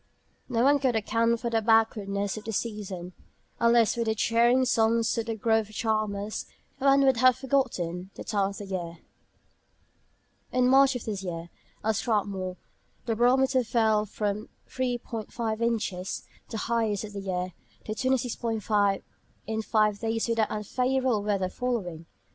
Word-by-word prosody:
No 235 -2 +1
one 285 +2 +5
could 255 -3 +1
account 230 +2 +1
for 235 -1 -2
the 225 -1 +2
backwardness 210 -3 +2
of 215 - -8
the 225 - -3
season. 195 -5 -4 0.5
Unless 235 -1 +4
for 235 - -1
the 220 -1 0
cheering 235 +4 +3
songs 230 -1 +2
of 230 0 -2
the 225 - -2
grove 220 0 +1
charmers, 215 -1 -2 0.3
one 275 0 +5
would 265 -2 +4
have 255 +1 +5
forgotten 210 -10 -1
the - - -7
time 200 -2 0
of 200 - -8
the 205 - -6
year. 175 -3 -4 1.5
In 255 0 +3
March 270 +1 +5
of 245 - -5
this 205 -3 -3
year, 170 -2 -5 0.3
at 220 -1 +1
Strathmore, 195 -5 -1 0.5
the 230 -1 0
barometer 255 +2 +3
fell 220 -2 +2
from 210 +1 -3 0.2
30·5 235 -3 -3
inches 215 -5 -1 0.3
(the 225 - -4
highest 220 -2 0
for 205 -1 -7
years) 185 -2 -3 0.3
to - - -5
28·65 225 -5 0 0.4
in 220 0 -2
five 215 -2 +2
days 225 0 -1
without 225 -2 +1
unfavourable 250 +2 0
weather 200 -2 0
following. 185 -8 -3
220 Hz, 145 wpm, -27 LUFS, 205-240 Hz, 1.5 s, one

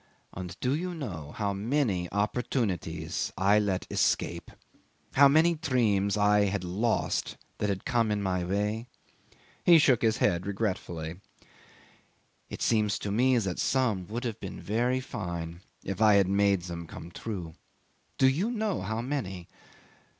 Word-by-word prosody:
"And 90 -1 -7
do 125 +1 +1
you 175 +4 -2
know 90 - -6
how 100 -2 -1
many 100 - 0
opportunities 100 - -1
I 100 +3 +4
let 100 -3 -1
escape; - - 0 0.6
how 140 +1 +7
many 160 +4 +4
dreams 110 - +1
I 105 0 +4
had 100 -1 -1
lost 100 +6 -1 0.2
that 105 - 0
had 95 -1 -3
come 115 -4 +1
in 105 -1 0
my 95 -2 -1
way?" 105 +5 -1 0.8
He 170 -1 +8
shook 130 -6 +4
his 110 -1 +2
head 85 +2 +1
regretfully. 90 -5 -3 1.3
"It - - -5
seems 105 -2 +2
to 100 - -4
me 125 +4 +3
that 95 -6 -1
some 115 -9 +1
would 120 +4 -4
have 115 -4 -3
been - - -7
very 120 +5 0
fine 85 -7 -5 0.2
if 95 +3 -4
I 105 -2 +6
had 100 -2 +4
made 100 -1 +2
them 85 -1 -6
come 85 +1 -9
true. 90 -4 -6 0.6
Do 130 - +5
you 165 - +1
know 220 -5 -1
how 110 +4 -2
many? 105 -10 -4
105 Hz, 150 wpm, -29 LUFS, 95-125 Hz, 1.3 s, He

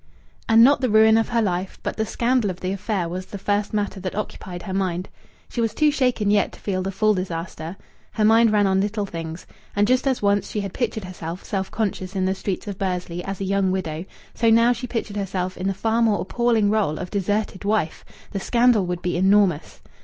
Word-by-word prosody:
And 225 0 +7
not 280 +3 +5
the 255 - +1
ruin 220 +1 +6
of 225 0 +2
her 235 -1 +2
life, 185 -1 -2
but - - -3
the 220 0 -1
scandal 240 -3 +1
of 180 -1 -5
the 185 - -2
affair, 195 -2 -2
was 185 +2 -5
the 200 - -7
first 205 +1 -1
matter 205 -2 -2
that 185 -1 -4
occupied 185 -4 -5
her 190 - -5
mind. 185 -1 -1 0.4
She 240 - -3
was 225 -1 -1
too 305 -1 +4
shaken 250 -7 +1
yet 205 -1 +2
to - - -13
feel 185 -2 -2
the 190 +1 -2
full 215 +3 +2
disaster. 170 -2 -5 0.4
Her 215 - +1
mind 225 +1 +5
ran 205 -1 +3
on 190 0 +2
little 205 +1 -1
things. 165 -2 -7 0.3
And 205 +1 +3
just 255 +2 +2
as 260 -2 +1
once 200 0 +1
she 210 - -2
had 195 -2 -5
pictured 220 -4 -2
herself 180 -1 -7
self 190 -2 -3
conscious 200 -3 -3
in 190 -1 +1
the 190 - +1
streets 195 0 -4
of 200 -2 -5
Bursley 180 -2 -3
as 195 -1 -5
a - - -1
young 195 0 +1
widow, 170 -3 -3 0.3
so 230 - +2
now 230 +2 +5
she 245 +1 -6
pictured 225 -3 -4
herself 185 -2 -2
in 185 - -3
the - - +2
far 225 +3 0
more 220 -3 +3
appalling 225 -1 +1
role 205 -8 +1
of 180 - -6
deserted 205 0 -1
wife. 205 -6 0 0.3
The 200 - -3
scandal 235 -3 +3
would 180 0 -3
be 175 -1 -1
enormous. 190 -3 +2
200 Hz, 225 wpm, -23 LUFS, 185-220 Hz, 0.4 s, And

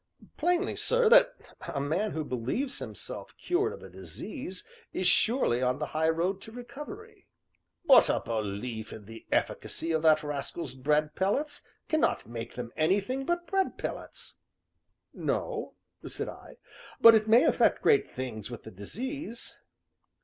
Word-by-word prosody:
"Plainly, 355 +2 +1
sir, - - +3
that - - +7 0.4
a 140 - -2
man 160 +10 -1
who 155 - -2
believes 145 - -2
himself - - -5
cured 395 +5 0
of 475 - -10
a - - -10
disease 190 -10 -7 0.3
is 185 - -2
surely 195 - +3
on 125 0 +1
the 150 - -2
high 160 +1 +2
road 180 +4 0
to 220 - -10
recovery." 295 - -10 0.6
"But 280 -5 +7
a - - +2
belief 110 0 -4
in 105 - -9
the 115 +2 -12
efficacy 165 - -1
of 160 -1 +1
that 155 -1 +5
rascal's 145 -1 -4
bread 150 +3 +1
pellets 285 - 0 0.3
cannot 315 -1 +1
make 115 0 -7
them 120 -1 -5
anything 200 +11 +1
but 345 0 0
bread 385 +2 0
pellets." - - -6 0.8
"No," 460 -3 -2 0.3
said - - -2
I, - - -12 0.4
"but 230 - +10
it 220 -1 +3
may 230 +3 +7
effect - - +3
great 425 -2 +4
things 125 -5 -5
with 120 -2 -8
the 110 - -10
disease." 235 - -5
190 Hz, 150 wpm, -29 LUFS, -, 0.8 s, but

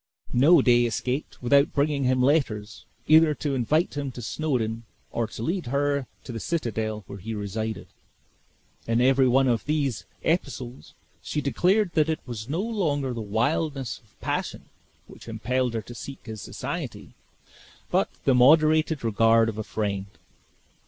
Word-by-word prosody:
No 140 +4 +6
day 120 -1 +5
escaped 125 +5 -3
without 140 +4 +4
bringing 140 -1 +1
him 130 0 +2
letters, 115 -7 0 0.2
either 155 -1 +6
to 145 -1 -2
invite 150 +7 +1
him 140 -2 -3
to 120 - -7
Snawdoun 115 -4 -1 0.3
or 115 -1 -1
to 110 - -7
lead 175 +1 -2
her 140 0 0 0.2
to - - -7
the 115 - -5
citadel, 110 -8 -2
where 100 - -9
he 110 +4 -5
resided. 110 +2 -4 1.0
In 115 +1 +2
every 130 +1 +4
one 135 +2 +4
of 120 -3 +1
these 145 -7 -1 0.2
epistles 135 -6 -3 0.3
she 150 - -3
declared 180 +7 +2
that 155 -1 +2
it 160 - 0
was 120 -1 -7
no 165 +6 -1
longer 155 - -1
the 115 - -4
wildness 130 +5 -1
of 110 - -31
passion - - -3 0.4
which - - -14
impelled 120 +2 -1
her 110 - -2
to 120 - -10
seek 135 +3 -9
his 110 -3 -7
society, - - -6 0.8
but - - +2 0.2
the 135 - +4
moderated 155 +3 +4
regard 115 +1 +4
of 110 -1 -6
a - - -2
friend. 100 -2 -3
130 Hz, 155 wpm, -26 LUFS, 115-150 Hz, 1.0 s, No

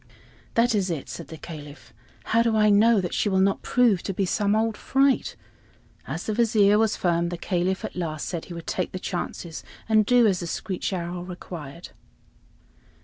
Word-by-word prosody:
"That 235 +1 +3
is 195 -3 +1
it," 150 -6 -4
said 125 - -7
the 160 - -9
Caliph. 150 -2 -10 0.3
"How 230 - +2
do 230 -1 +2
I 210 -1 +5
know 220 +2 +5
that 180 - -4
she 210 - +1
will 190 -1 +2
not 195 +1 +2
prove 230 -7 +3
to 195 - -4
be 195 - +1
some 205 +3 +1
old 220 0 +1
fright?" 270 +3 +1 0.7
As - - -4
the 215 - -2
Vizier 210 -2 +4
was 220 -1 +2
firm, 170 -1 +1
the 175 - -4
Caliph 180 +2 -1
at - - -7
last 160 -4 -3
said 170 -3 -4
he 175 - -9
would 170 -1 -8
take 185 - -2
the - - -3
chances 175 -2 -5 0.2
and 215 -1 +4
do 245 +2 +4
as 195 -5 +2
the 175 - -4
screech 185 +3 -3
owl 175 -1 -4
required. 175 -3 -8
190 Hz, 195 wpm, -25 LUFS, 175-215 Hz, 0.7 s, I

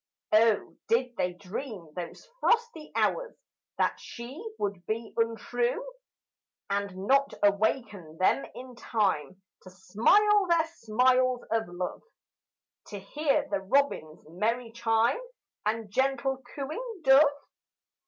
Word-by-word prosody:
Oh, 220 -1 +3
did 245 +1 +1
they 180 0 -1
dream 195 - -7
those 175 -2 -7
frosty 460 -12 +1
hours - - 0 0.4
That - - +1
she 255 - -9
would 200 -3 -3
be 225 +1 -3
untrue 240 - 0 0.9
And 200 -1 -2
not 275 +4 +3
awaken 200 - +1
them 185 +9 +3
in 255 0 -9
time 190 - -1 0.2
To 185 - -12
smile 385 - +3
their 335 -2 +3
smiles 250 +1 +2
of 225 0 +1
love, 175 +1 -5 0.9
To 205 - -7
hear 280 +9 0
the 200 - -1
robin's 195 - 0
merry 225 +8 -1
chime, 230 - +1 0.5
And 220 -1 -2
gentle 265 +2 0
cooing 360 - -5
dove? 270 0 +8
230 Hz, 115 wpm, -28 LUFS, 200-270 Hz, 0.9 s, dove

